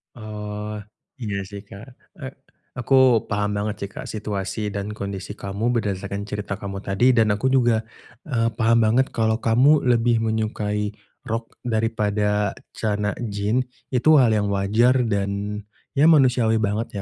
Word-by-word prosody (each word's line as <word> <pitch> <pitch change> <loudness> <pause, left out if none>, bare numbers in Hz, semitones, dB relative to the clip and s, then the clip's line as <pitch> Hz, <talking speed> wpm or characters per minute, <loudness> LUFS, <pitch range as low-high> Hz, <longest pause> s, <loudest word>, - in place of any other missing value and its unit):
Oh, 105 -1 -6 0.5
iya 100 -2 -2
sih, 100 0 -9
Kak. 100 +3 -12 0.3
E 135 - -5 0.5
aku 130 +1 +1 0.4
paham 105 0 0
banget 105 +1 -2
sih - - -20
Kak, - - -6
situasi 105 -1 -3
dan 100 0 -4
kondisi 100 -2 -5
kamu 100 +5 -2
berdasarkan 100 -2 -2
cerita 105 -1 -4
kamu 100 0 -6
tadi 110 +7 +3
dan 110 -3 +4
aku 105 +6 -1
juga, 120 -4 +3 0.4
eee, 115 -5 +1
paham 115 +1 +3
banget 120 +5 +3
kalau 110 0 +1
kamu 130 +7 +4
lebih 120 -1 +3
menyukai 110 -2 -1 0.3
rok 115 +1 -4
daripada 105 -3 0 0.2
celana 105 -1 -1 0.2
jin. 105 +5 0 0.3
Itu 145 +4 +5
hal 115 -4 +4
yang 105 -1 +1
wajar 110 +6 +3
dan 100 0 -2 0.3
ya 145 +3 +5
manusiawi 125 -6 +4
banget 105 0 -2
105 Hz, 140 wpm, -23 LUFS, 105-115 Hz, 0.5 s, Itu